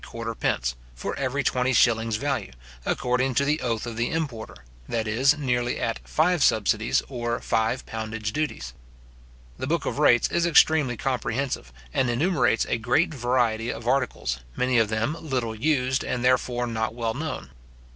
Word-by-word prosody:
for - - -4
every 140 +1 -1
twenty 125 +1 +1
shillings 115 -2 +3
value, 140 +4 -2 0.4
according 125 +1 0
to 140 - +3
the 150 +2 +1
oath 115 -3 -1
of 115 -2 -6
the 120 +1 0
importer, 140 -9 -4 0.3
that 110 -1 -1
is, 130 +7 +3
nearly 125 -4 -1
at 115 - -1
five 170 +1 +2
subsidies, 110 0 +2
or 120 -3 -2
five 115 +3 0
poundage 110 -1 -4
duties. 90 - -3 0.9
The 130 - -3
book 165 +3 0
of - - -2
rates 120 -5 +5
is 170 0 +2
extremely 155 -6 +4
comprehensive, 125 - -2 0.2
and 130 - +1
enumerates 130 - +2
a 115 - 0
great 155 +9 +2
variety 120 -3 0
of 115 - -7
articles, 125 - 0 0.2
many 125 -1 +2
of 110 -2 +2
them 110 +7 -1
little 125 -7 -2
used, 130 +1 +1
and, 125 0 -2
therefore, 125 -1 +2
not 110 -1 -2
well 115 -2 -1
known. 145 - -5
125 Hz, 155 wpm, -25 LUFS, 115-140 Hz, 0.9 s, rates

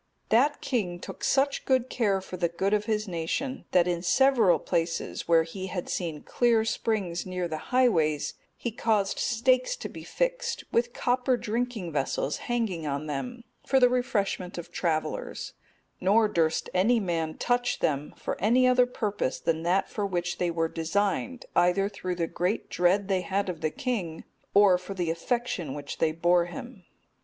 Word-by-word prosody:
That 275 +7 +3
king 185 -9 -1
took - - -9
such 275 +1 +2 0.3
care 200 -5 +1
for 185 - -8
the 175 -1 0
good 190 +4 -1
of 210 0 +1
his 215 -1 -1
nation, 185 +10 -3
that 180 -1 +3
in 175 -1 0
several 230 -2 +4
places 165 0 -2
where 165 -1 +5
he 185 +3 -6
had 180 -2 -4
seen 160 -5 -3
clear 235 -2 +2
springs 200 -7 -1
near 180 -1 -2
the 155 -2 -4
highways, 175 - +2 0.2
he 235 - -3
caused 215 -3 0
stakes 255 - +2
to - - -6
be - - -10
fixed, - - -2
with 240 +1 +1
copper 250 +1 +1
drinking 230 -4 -3
vessels 140 0 -1
hanging 210 -10 -1
on 140 +1 -2
them, 235 - -5 0.2
for 265 - +3
the 250 -1 +6
refreshment 205 -7 -1
of 175 0 -7
travellers; 160 -3 -2 0.5
nor 215 +4 +4
durst 165 -6 +1
any 220 +6 +3
man 165 -5 -2
touch 245 0 +1
them 145 -1 -1
for - - -4
any 240 +6 +4
other 250 0 +5
purpose 210 - -2
than 160 -1 0
that 180 +4 +1
for 205 -2 -2
which 175 -2 -2
they 175 - +1
were 165 -1 0
designed, 200 +9 -1
either 180 +3 +3
through 185 -3 -4
the 170 -1 0
great 180 +5 -2
dread 185 +3 +2
they 190 -2 +1
had 195 +1 -1
of 170 -3 -5
the 155 - +1
king, 180 -6 -3 0.3
or 200 -3 +6
for 190 +2 -7
the 175 -3 -1
affection 175 - -2
which 145 -1 -7
they 160 - +3
bore 175 +2 +3
him. 190 +3 -9
190 Hz, 170 wpm, -27 LUFS, 170-240 Hz, 0.5 s, the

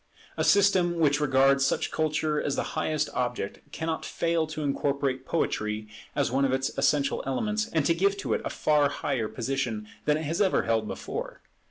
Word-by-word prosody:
A - - 0
system 185 -4 +4
which 145 -3 +3
regards 135 -1 +4
such 135 - 0
culture 155 -1 0
as 140 - -1
the - - 0
highest 155 -1 0
object 120 -5 -2
cannot 160 0 -3
fail 165 -1 0
to 155 -1 -5
incorporate 140 -2 -1
Poetry 105 -9 -1 0.3
as - - +1
one 135 +2 +2
of 135 - +2
its 135 0 -1
essential 140 0 +1
elements, 215 - -1
and 160 -3 +1
to 165 - +4
give 195 +4 +1
to - - -2
it - - 0
a - - -2
far 150 -2 +2
higher 130 -5 -2
position 120 -3 -3 0.2
than 150 0 +3
it 155 - -4
has 165 +6 -1
ever 190 -2 +3
held 115 -1 0
before. - - -6
145 Hz, 185 wpm, -27 LUFS, 135-160 Hz, 0.3 s, system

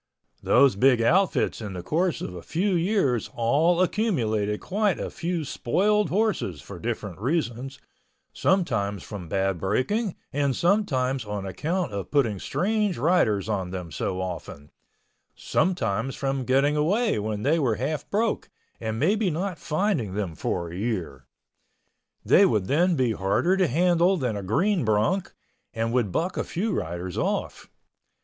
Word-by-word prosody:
Those 140 -6 +4
big 125 +3 +4
outfits 175 +4 +2
in 105 -3 -5
the 90 -1 -6
course 170 - 0
of - - -5
a 90 - -7
few 190 - -1
years 165 - +1
all 155 +10 +3
accumulated 110 - 0
quite 205 0 0
a - - -4
few 170 -3 -3
spoiled 205 - +1
horses 200 - 0
for 65 - -10
different 95 -4 -4
reasons, 130 - -2 0.6
sometimes 110 - 0
from 95 -6 -8
bad 95 -1 0
breaking 170 - 0 0.2
and 140 -2 +1
sometimes 135 - +1
on 105 -2 -5
account 150 - -2
of 100 -3 -4
putting 115 -9 +1
strange 210 - 0
riders 115 - +2
on 95 -4 -2
them 90 -3 -6
so 90 +6 -3
often, 85 -5 -6 0.6
sometimes 125 - 0
from 135 -1 -2
getting 135 +3 +3
away 200 - +1
when 105 0 -3
they 160 +4 +2
were 125 -7 +1
half 140 +7 -3
broke, 220 +2 0 0.3
and 110 -1 -3
maybe 195 - +2
not 175 +1 -3
finding 155 - -1
them 100 -5 -2
for 85 +2 -3
a - - -7
year. 90 - -3 1.0
They - - +6
would 105 -3 +1
then 170 - +2
be 130 -5 +1
harder 105 - +1
to 190 -2 +2
handle 175 +5 +3
than 125 -8 -1
a 100 - -3
green 175 - +1
bronc 110 - +1 0.4
and 115 +1 -1
would 120 -6 +1
buck 175 - -1
a - - 0
few 205 +5 -2
riders 85 - -3
off. - - -2
130 Hz, 150 wpm, -25 LUFS, -, 1.0 s, They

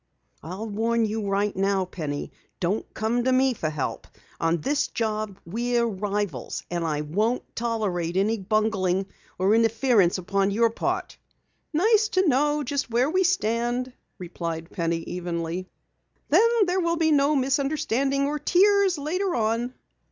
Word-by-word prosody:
I'll 185 +8 -6
warn 225 +2 +1
you 215 -1 -3
right 200 +1 0
now, 195 0 +1
Penny, 150 -5 -5 0.3
don't 190 +5 -1
come 230 +3 0
to 260 - +2
me 260 0 +3
for 160 -8 -2
help. 150 -3 -4 0.3
On 165 +1 +1
this 290 - 0
job 215 -3 -3
we're 235 +6 0
rivals. 205 - -3
And 175 -1 -1
I 150 -2 -1
won't 210 +11 0
tolerate 195 -7 -1
any 215 +3 +1
bungling 195 -2 +1 0.3
or 190 +3 +3
interference 225 -4 +3
upon 195 +2 0
your 225 +3 +2
part!" - - -3 0.5
"Nice 430 +7 +3
to 375 -1 +4
know 295 +2 +2
just 280 -1 -2
where 245 +5 +2
we 375 +2 +3
stand," 245 -6 0 0.2
replied 170 -2 -5
Penny 165 -2 -1
evenly. 175 +1 -4 0.6
"Then 400 +10 +5 0.2
there 365 +1 0
will 335 -1 0
be 320 -1 +2
no 290 0 +3
misunderstanding 275 0 +1
or 295 +1 -2
tears 385 +3 +4
later 360 +6 -1
on." 230 +2 0
225 Hz, 145 wpm, -25 LUFS, 185-275 Hz, 0.6 s, Then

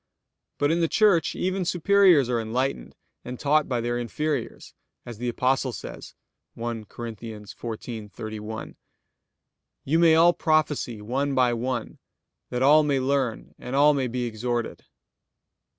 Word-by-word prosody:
But 145 +1 +2
in 170 - +1
the 165 - +3
Church 200 -3 +3
even 185 +1 -1
superiors 180 -4 +4
are 120 -2 0
enlightened 125 +5 -3 0.3
and 125 0 -7
taught 150 +1 +2
by 120 -2 0
their 120 +1 -1
inferiors, 150 +5 -3 0.3
as 120 -3 -9
the 120 0 -2
Apostle 130 +2 0
says - - -9 0.4
(1 115 -2 -4
Cor. 120 +3 -8
14:31): 110 0 -7 1.1
"You 160 +5 +2
may 165 -2 +6
all 170 +2 +6
prophesy 150 -10 0
one 135 +5 -1
by 125 -2 +3
one, 120 0 -3 0.5
that 125 +1 -1
all 150 +3 +7
may 145 -3 +1
learn 130 -3 -1
and 125 - -5
all 145 +2 +6
may 135 -3 0
be 125 +1 -3
exhorted." 120 +1 -3
125 Hz, 135 wpm, -25 LUFS, 115-150 Hz, 1.1 s, all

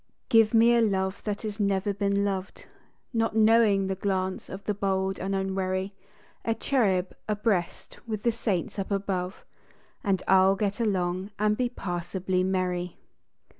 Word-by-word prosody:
Give 225 -2 +5
me 230 +1 +6
a 235 - +4
love 190 -3 0
that 210 0 -3
has 215 0 -5
never 200 0 +1
been 200 0 0
loved, 190 -1 -4 0.5
Not 225 -1 0
knowing 220 -3 +4
the 190 - -1
glance 190 -1 -2
of 195 +1 -7
the 210 - -1
bold 190 -1 -1
and 195 +1 -2
unwarv. 190 0 -1 0.5
A 225 - 0
cherub 195 -11 +1
abreast 210 -4 -1
with 215 -2 -4
the 235 - +3
saints 205 -5 -2
up 195 - -3
above, 190 -2 -2 0.6
And 190 -2 0
I 190 - +6
ll 195 +1 +4
get 200 +1 -2
along 185 -3 0
and 210 0 +2
be 245 +1 0
passably 185 -2 -2
merry. 180 -2 -1
195 Hz, 155 wpm, -27 LUFS, 190-210 Hz, 0.6 s, me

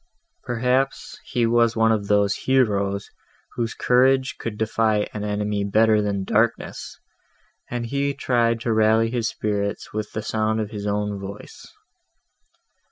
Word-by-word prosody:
Perhaps, 125 +3 -1
he 120 -1 0
was 115 0 +3
one 115 0 +3
of 105 -2 0
those 100 -1 +3
heroes, 100 -7 0 0.4
whose 115 -2 -3
courage 130 +3 +2
can 110 -2 -5
defy 110 -1 +1
an 105 - -4
enemy 105 0 -1
better 110 +1 +3
than 100 -2 -1
darkness, 110 +4 -1 0.7
and 120 -1 -3
he 140 +3 -1
tried 115 -2 +1
to 115 -1 0
rally 110 +1 +3
his 120 -2 -1
spirits 100 -2 -3
with 105 0 -4
the 110 - -3
sound 110 0 0
of 105 -1 -3
his 105 -2 -5
own 105 0 -1
voice. 100 +1 -9
110 Hz, 140 wpm, -23 LUFS, 105-120 Hz, 0.7 s, was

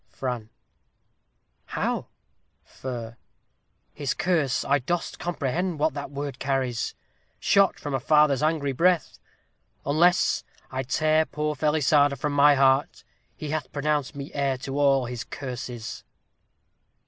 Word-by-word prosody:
Fran. 120 -4 -4 1.2
How? - - -2 0.6
Fer. 120 -3 -7 0.8
His 140 -2 -2
curse 160 -8 +1
I 145 +1 +3
dost 170 +7 -3
comprehend 175 +1 -2
what 155 0 +1
that 140 0 -5
word 140 -2 -5
carries? 135 -4 -1 0.4
Shot 200 -1 +3
from 145 -2 -5
a 135 - +1
father's 150 0 +4
angry 155 -2 +1
breath? 170 +5 +1 0.7
Unless 170 +5 +3 0.3
I 130 0 -2
tear 155 +4 +2
poor 150 0 -2
Felisarda 150 -2 +3
from 145 +2 -2
my 145 0 +6
heart, 135 +1 +2 0.3
He 150 -2 -6
hath 155 -1 -3
pronounced 145 -1 -1
me 140 0 -7
heir 140 -2 0
to 135 +2 -4
all 135 -2 +4
his 120 0 -5
curses. 125 -3 -6
145 Hz, 125 wpm, -26 LUFS, 130-155 Hz, 1.2 s, my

